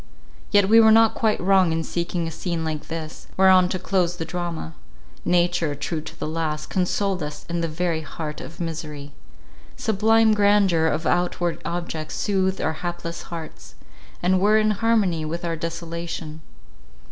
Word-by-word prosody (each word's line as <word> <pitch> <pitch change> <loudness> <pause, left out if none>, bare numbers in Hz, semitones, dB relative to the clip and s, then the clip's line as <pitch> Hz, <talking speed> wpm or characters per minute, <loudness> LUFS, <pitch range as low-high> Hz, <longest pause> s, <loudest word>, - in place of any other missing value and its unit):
Yet 205 -1 +4
we 225 +2 +7
were 220 -1 +7
not 225 0 +6
quite 220 -2 +1
wrong 190 -2 +4
in 160 0 -1
seeking 170 0 -2
a - - -4
scene 165 0 -3
like 155 -1 -4
this, 160 -1 -7
whereon 185 -1 +6
to 185 - -1
close 180 -1 0
the 165 - -4
drama. 170 - -4 0.5
Nature, 175 -3 +1
true 155 +2 -3
to 155 - -11
the - - -3
last, 155 -1 -3
consoled 190 0 0
us 150 0 -6
in 170 0 -2
the 165 - 0
very 165 0 -1
heart 155 -1 -6
of 165 - -10
misery. 155 -4 -5 0.7
Sublime 220 +1 +3
grandeur 200 -5 +3
of 160 0 -1
outward 175 -1 0
objects 170 -2 -4
soothed 190 -2 0
our 160 - 0
hapless 175 -1 -4
hearts, 165 -2 -8 0.5
and 185 +1 +3
were 210 +2 +5
in 215 0 +3
harmony 210 -6 +1
with 170 +3 -4
our 165 -1 -1
desolation. 165 -1 -5
170 Hz, 160 wpm, -23 LUFS, 160-190 Hz, 0.7 s, we